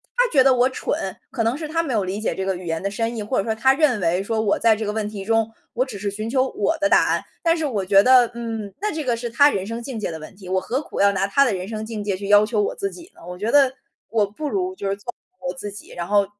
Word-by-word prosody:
他 - - +3
觉 275 - +5
得 265 0 +5
我 250 +1 +3
蠢， 195 -7 -3
可 240 -4 -1
能 230 +4 0
是 310 0 -5
他 330 +2 0
没 275 -6 -3
有 210 -3 +1
理 190 +3 -3
解 - - 0
这 190 - -3
个 190 -1 0
语 180 0 -8
言 165 -1 -2
的 195 - -1
深 230 +3 -2
意， - - -3
或 210 +5 -2
者 - - +2
说 220 - -1
他 265 +5 +4
认 275 -6 +2
为 180 +1 +1
说 220 +2 -1
我 205 -2 +1
在 230 -1 +4
这 220 - -3
个 210 - -2
问 215 -1 -2
题 200 -2 -7
中， 225 0 +1 0.2
我 245 - +1
只 230 -7 -8
是 200 +1 -2
寻 215 +3 -5
求 260 +1 +2
我 290 +7 -1
的 300 -1 +2
答 - - +5
案。 - - +1 0.2
但 330 -1 +4
是 320 - -1
我 215 -9 -1
觉 195 +1 +6
得， 250 +1 +5
嗯， 225 -4 -5
那 425 - 0
这 310 0 -3
个 245 -3 0
是 240 +1 -4
他 285 +5 +5
人 195 -7 -2
生 230 +2 -5
境 250 -3 -5
界 210 - -2
的 160 - -5
问 155 - -10
题， 190 -1 -13
我 185 0 +1
何 260 +8 -2
苦 - - -7
要 200 0 +5
拿 195 0 0
他 275 +8 +4
的 250 -6 +1
人 185 0 -4
生 215 0 -5
境 220 -1 -5
界 200 -2 -1
去 200 +1 -6
要 205 0 +7
求 215 -1 0
我 205 - -1
自 395 - -2
己 350 0 -13
呢？ - - -18
我 180 0 -7
觉 215 +5 -2
得 275 -2 +5 0.4
我 220 -2 +2
不 210 +10 -6
如 370 +1 -1
就 200 - -3
是 195 - 0
做 225 +5 -8 0.3
好 - - -12
我 - - -3
自 210 -6 -6
己， 205 - -11
然 175 -1 -5
后 200 0 +3
220 Hz, 345 characters per minute, -22 LUFS, 200-260 Hz, 0.4 s, 要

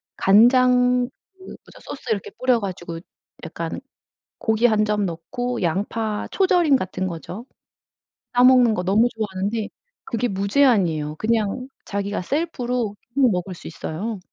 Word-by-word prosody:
간장 250 +3 +4 0.2
그 380 - -38
뭐죠 375 - -13
소스 275 - -9
이렇게 205 -3 -1
뿌려 255 -2 +2
가지고 175 -4 -5 0.4
약간 165 +4 -5 0.6
고기 220 +2 +2
1 215 -2 +2
점 210 -2 0
넣고, 245 +9 -4
양파 210 +5 -1
초절임 360 -7 +3
같은 185 -4 -3
거죠. 180 +7 -7 0.9
싸 245 - +4
먹는 250 -3 +6
거 180 - -2
너무 205 +6 +3
좋아하는데 210 0 -3 0.4
그게 240 0 -2
무제한이에요. 195 - +2
그냥 225 +4 -1 0.2
자기가 200 -1 -3
셀프로 250 - -2 0.2
막 265 -4 +4
먹을 180 0 -3
수 - - -10
있어요. 195 +7 -5
215 Hz, 270 characters per minute, -22 LUFS, 190-250 Hz, 0.9 s, 먹는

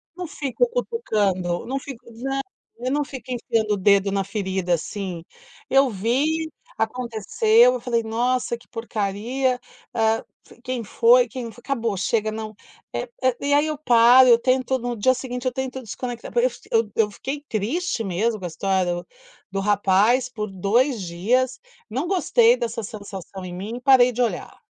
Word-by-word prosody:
Não 360 -1 -5
fico 300 - -1
cutucando. 205 - -1
Não 270 +3 -2
fico 265 -3 -9
nã 270 +4 -3 0.4
eu 255 - 0
não 290 0 +1
fico 265 -2 -9
enfiando 225 -3 0
o - - -5
dedo 200 +1 +3
na 195 0 0
ferida, 190 -3 -2
assim. 180 0 -4 0.5
Eu 270 0 +5
vi, 285 +11 0 0.3
aconteceu, 255 - +3
eu - - -3
falei: 235 -2 0
"Nossa, 235 +2 -1
que 235 - -22
porcaria, 230 +4 -2 0.3
ah, 225 0 +1 0.2
f - - -18
quem 255 -2 -3
foi, 485 - +4
quem 245 -4 -6
fo" 220 - -16
acabou, 230 -6 -1
chega, 215 +3 0
não, 215 -1 -6 0.4
eh - - -3
eh, 255 -2 +2
e 285 0 0
aí, 295 +2 +4
eu 305 -1 -3
paro, 250 -1 +6
eu 235 -1 +7
tento 260 0 +1
no 245 0 -3
dia 255 +5 +4
seguinte 250 -1 -5
eu 255 - +1
tento 265 0 -4
desconectar 240 +2 -6
porque 240 +1 +3
f 245 - -8
eu 225 -2 +2
eu 210 -2 +2
fiquei 280 +7 -6
triste 235 - -1
mesmo 215 +4 -1
com 185 - -6
a - - -1
história 180 +1 0
do 175 0 -7 0.4
do 195 - -2
rapaz 205 +5 +3
por 215 -4 -5
2 220 +7 +1
dias, 240 +10 0 0.3
não 265 +9 -2
gostei 455 +6 +4
dessa 230 -1 -3
sensação 195 -3 -8
em 180 - -7
mim, 210 +7 -5
parei 255 -2 +6
de 245 - -2
olhar. 235 - -4
235 Hz, 170 wpm, -23 LUFS, 205-260 Hz, 0.5 s, eu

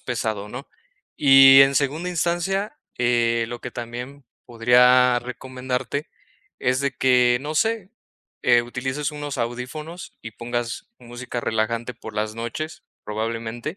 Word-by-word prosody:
pesado, 110 -4 -3
¿no?, 130 +6 -8 0.5
y 135 -1 +8
en 135 0 +3
segunda 150 +6 0
instancia, 175 +4 -1 0.2
eh, 120 -1 +2
lo 120 0 -7
que 125 - -6
también 125 +4 -7 0.2
podría 125 +1 +5
recomendarte 130 +3 -4 0.5
es 130 +1 0
de 140 -1 -1
que, 125 -2 +4
no 150 +2 -4
sé, 220 +1 0 0.5
eh, 120 -1 +4
utilices 130 +4 -3
unos 145 -1 -5
audífonos 125 +8 -5
y 115 - -7
pongas 120 +1 -4
música 120 0 -6
relajante 115 +2 -1
por 110 -1 -10
las 105 0 -2
noches, 120 +8 -6 0.2
probablemente, 115 - -4
125 Hz, 125 wpm, -23 LUFS, 120-140 Hz, 0.5 s, y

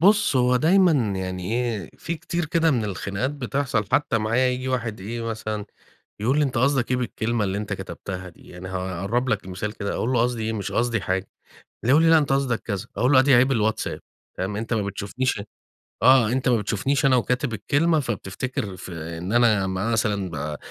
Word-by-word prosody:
بُص 200 -4 +4
هو 125 0 +4
دايمًا 180 +4 +5 0.2
يعني، 95 +1 -4
إيه 115 -7 -2
في 170 - -3
كتير 170 +1 -3
كده 165 +1 +2
من 120 -6 +1
الخناقات 100 +5 -2
بتحصل، 135 -4 -1
حتى 130 -6 +2
معايا 115 +4 +2
ييجي 125 +1 -2
واحد 115 -5 -2
إيه 115 +4 -5
مثلًا، 110 -2 -4 0.6
يقول 125 +7 +2
لي 150 - +4
"أنت 130 -4 -1
قصدك 130 -1 +2
إيه 125 - +3
بالكلمة 115 -2 -1
اللي 95 +1 -1
أنت 105 -1 -4
كتبتها 95 -1 -6
دي؟" 85 - -17
يعني 90 +1 -9
هاقرب 95 +7 -2
لك 105 -5 -1
مثال 95 +3 -4
كده 100 -2 -4
أقول 120 - -1
له 120 - +3
"قصدي 120 -2 -1
إيه 110 +1 -1
مش 100 -4 -4
قصدي 115 -2 +1
حاجة" 95 0 -2 0.6
يقول 140 +7 +5
لي 165 - +5
"لا 160 - +7
أنت 145 -3 0
قصدك 135 -4 +1
كذا" 100 0 -4
أقول 125 +4 +2
له 130 - +7
"أدي 135 0 +5
عيب 130 +3 +5
الWhatsApp" 110 -2 0 0.4
فاهم 95 +2 -2
أنت 115 +2 -2
ما 110 - +1
بتشوفنيش 100 +4 -2 0.6
آه 125 -4 +6
أنت 130 0 0
ما 125 - +4
بتشوفنيش 115 +7 0
أنا 130 -1 +5
وكاتب 125 +1 0
الكلمة 155 - +2
فبتفتكر 105 -3 -4
ف 90 - -9
إن 85 +3 -5
أنا 115 -5 +4
مثلًا 100 0 0
ب 75 -1 -4
115 Hz, 195 wpm, -24 LUFS, 100-130 Hz, 0.6 s, لا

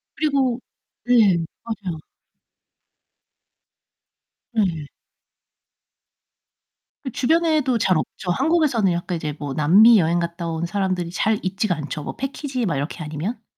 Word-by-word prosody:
그리고 275 -5 +1 0.5
네. 225 -7 +5 0.3
맞아요. 195 -8 -5 2.5
네. 185 -10 0 2.2
그 260 - -5
주변에도 305 -1 +2
잘 185 -5 +2
없죠. 180 +3 -4
한국에서는 270 - +2
약간 175 0 -3
이제 155 -2 -4
뭐 145 -2 -4
남미 200 - +6
여행 170 0 +2
갔다 170 0 -4
온 165 0 -2
사람들이 185 -1 -1
잘 215 +4 0
있지가 190 +1 -1
않죠, 150 -1 -5
뭐 - - -6
패키지 270 -2 -3
막 165 -7 -1
이렇게 145 +4 -4
아니면. 160 +10 -5
190 Hz, 240 characters per minute, -22 LUFS, 170-245 Hz, 2.5 s, 남미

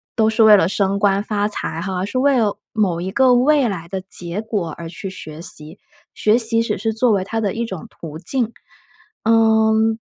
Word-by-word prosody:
都 220 -2 +3
是 220 0 +3
为 215 -1 +8
了 185 -3 +3
升 200 0 0
官 200 0 +2
发 205 -1 -1
财 165 -5 -2
哈， 185 0 -3
是 205 - -4
为 270 0 +3
了 210 -3 0
某 185 -6 0
一 190 +2 -4
个 260 +2 +4
未 275 +2 +3
来 175 -5 -5
的 190 +1 -3
结 180 -1 -3
果 205 -7 -3
而 170 -1 -7
去 180 +3 -7
学 155 -4 -7
习， 155 -2 -5 0.4
学 215 +2 +2
习 230 -1 +1
只 - - -2
是 220 +3 -2
作 230 +1 +2
为 190 -2 +1
它 225 +3 -3
的 200 -3 -1
一 235 +1 -2
种 190 -7 -7
途 155 -2 -9
径。 235 +6 0 0.7
嗯， 220 0 +3
210 Hz, 220 characters per minute, -19 LUFS, 185-225 Hz, 0.7 s, 为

